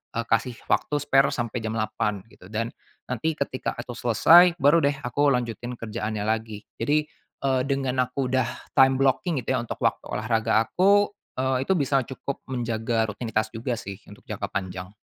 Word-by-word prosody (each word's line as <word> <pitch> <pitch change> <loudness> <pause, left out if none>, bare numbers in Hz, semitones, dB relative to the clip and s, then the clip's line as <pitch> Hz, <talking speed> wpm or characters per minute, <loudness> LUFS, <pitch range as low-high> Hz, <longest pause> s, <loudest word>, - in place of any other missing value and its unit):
eee, 115 - +1
kasih 120 +2 +1 0.2
waktu 150 - +1
spare 135 -1 +3
sampai 120 0 -3
jam 110 - -2
8.00 110 -2 -1
gitu, 90 - -17
dan 115 +2 -2 0.4
nanti 130 +6 -1
ketika 140 -3 -3
aku 120 +1 -7
selesai, 170 +10 +6
baru 145 +4 +6
deh 140 0 +2
aku 145 +3 +1
lanjutin 120 0 -3
kerjaannya 110 -2 -4
lagi. 110 -2 -2 0.2
Jadi, 150 +1 +2 0.4
eee, 130 -2 +2
dengan 130 -2 0
aku 125 0 -3
udah 130 -2 +2 0.3
time 135 0 +6
blocking 135 +3 +1
gitu - - 0
ya - - 0
untuk - - -7
waktu - - 0
olahraga 110 +1 +1
aku, 200 - +3 0.3
eee, 130 0 0
itu 190 - +4
bisa 140 -4 +2
cukup 135 +1 -5
menjaga 115 -3 -1
rutinitas 110 -1 -2
juga 120 +2 -3
sih, 100 -3 -7
untuk - - -14
jangka - - -3
panjang. 95 -1 -5
125 Hz, 170 wpm, -25 LUFS, 110-135 Hz, 0.4 s, selesai